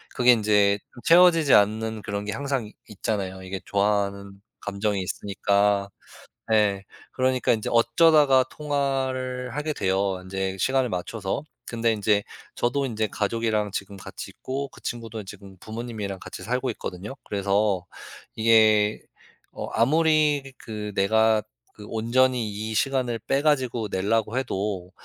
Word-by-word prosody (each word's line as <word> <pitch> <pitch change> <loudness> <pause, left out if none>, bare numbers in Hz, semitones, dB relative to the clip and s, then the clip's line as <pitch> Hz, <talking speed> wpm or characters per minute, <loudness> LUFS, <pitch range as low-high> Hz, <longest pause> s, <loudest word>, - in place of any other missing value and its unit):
그게 125 0 +6
인제 105 -3 +3 0.2
채워지지 165 -4 +6
않는 110 +1 +3
그런 100 0 -4
게 105 - -3
항상 135 -2 -2
있 105 - -13
있잖아요 95 -3 -3
이게 95 +1 -5
좋아하는 100 -1 -1 0.2
감정이 100 0 -1
있으니까. 100 +1 0 0.6
예. 105 -3 +3 0.3
그러니까 130 -1 +1
인제 110 -2 -1
어쩌다가 135 +3 +5
통화를 130 -4 -2
하게 150 +1 -1
돼요 95 -4 0
인제 95 0 -3
시간을 130 +1 +1
맞춰서. 95 +5 -3 0.2
근데 115 -1 0
인제 105 -1 +1 0.3
저도 135 +4 0
인제 110 -4 -1
가족이랑 110 0 -1
지금 100 0 -5
같이 95 - -9
있고 140 +2 -5
그 - - -17
친구도 115 -2 -5
지금 95 0 -12
부모님이랑 110 -3 -5
같이 - - -9
살고 125 +3 -1
있거든요. 100 +2 -7
그래서 100 -2 0 0.5
이게 110 -2 +4 0.6
어 - - -4
아무리 150 +1 +2
그 105 -2 -6
내가 110 +2 +3 0.3
그 105 - -11
온전히 120 +1 +1
이 110 +2 -5
시간을 125 -1 0
빼 135 +6 0
가지고 130 -7 +1
내려고 105 +4 0
해도 100 -7 -2
110 Hz, 300 characters per minute, -25 LUFS, 100-130 Hz, 0.6 s, 그게